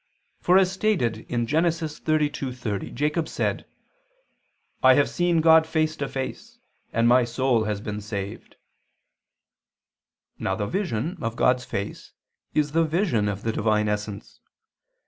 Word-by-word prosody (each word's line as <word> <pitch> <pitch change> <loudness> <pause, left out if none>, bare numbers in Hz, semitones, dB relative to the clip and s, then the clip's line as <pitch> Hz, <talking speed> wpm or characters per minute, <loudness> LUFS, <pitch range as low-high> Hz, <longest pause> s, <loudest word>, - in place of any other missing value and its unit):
For, 180 +1 +4
as 190 -1 +4
stated 175 - 0
in 120 -1 0
Gen. 160 +7 +2
32:30, 145 - -2
Jacob 150 +3 0
said: - - -2 1.1
"I 130 0 +7
have 145 - +3
seen 175 -2 +1
God 160 0 +6
face 155 -1 0
to 140 - -2
face, 205 - -6 0.3
and 115 +1 +2
my 125 +1 +5
soul 120 -1 +1
has 105 -2 -2
been 105 0 -5
saved." 100 -1 -6 1.8
Now - - -1
the 105 - -2
vision 170 - -2
of 115 -2 -3
God's 125 +1 +2
face 100 +1 -5 0.4
is 150 -1 +1
the 165 +2 +3
vision 160 - +1
of 100 0 -5
the 115 - 0
Divine 105 -1 +1
essence. 105 -1 -4
130 Hz, 135 wpm, -25 LUFS, 110-160 Hz, 1.8 s, I